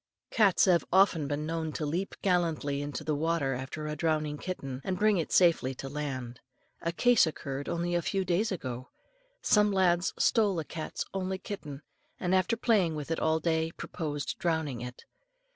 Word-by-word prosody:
Cats 205 -6 +4
have 175 -3 +4
been 190 - +5 0.3
often 145 +1 -2
known 160 0 -2
to 155 - -2
leap 175 +7 -2
gallantly 165 -6 +1
into 145 0 -4
the 155 0 -1
water 150 -2 0
after 135 +4 -5
a 150 0 -3
drowning 155 -2 0
kitten, 135 -8 -5
and 185 -1 -2
bring 210 0 +3
it 165 - -2
safely 165 -7 +4
to 135 - -7
land. 130 -4 -5 0.4
A 170 - -1
case 240 +2 +4
occurred 140 -2 -5
only 170 +1 -1
a 175 - +2
few 190 +2 -1
days 185 +5 +1
ago. 130 -8 -5 0.5
Some 210 -1 +4
lads 180 -2 +2
stole 210 -6 +3
a 160 - -2
cat's 160 0 -5
only 190 0 -2
kitten, 155 -7 -7 0.4
and 180 0 0
after 190 +4 +2
playing 205 -9 +2
with 150 +1 -5
it 165 - 0
all 160 0 +2
day, 160 0 0
proposed 145 -4 -4
drowning 160 -8 -1
it. 125 0 -8
160 Hz, 175 wpm, -30 LUFS, 145-185 Hz, 0.5 s, been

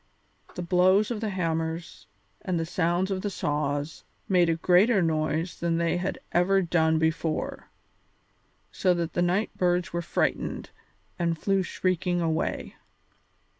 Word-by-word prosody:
The 180 - -4
blows 185 +5 +3
of 225 -2 -3
the 220 - -1
hammers 165 -2 -3 0.3
and 180 -3 -1
the 165 - -1
sounds 175 +3 0
of 190 -1 -1
the 205 - -2
saws 145 -3 -2 0.2
made 180 -3 +3
a 165 - +2
greater 185 +6 +4
noise 160 +1 -1
than 170 -1 0
they 170 +1 +1
had 180 +2 -2
ever 190 +3 +3
done 160 -2 +2
before, 160 0 -2 1.0
so 180 -2 +2
that 170 -1 -3
the 175 - 0
night 180 +5 0
birds 180 -1 0
were 170 - -1
frightened 170 - -2 0.5
and 170 -1 0
flew 195 +3 +1
shrieking 180 0 -1
away. 160 -2 -2
175 Hz, 140 wpm, -27 LUFS, 165-185 Hz, 1.0 s, greater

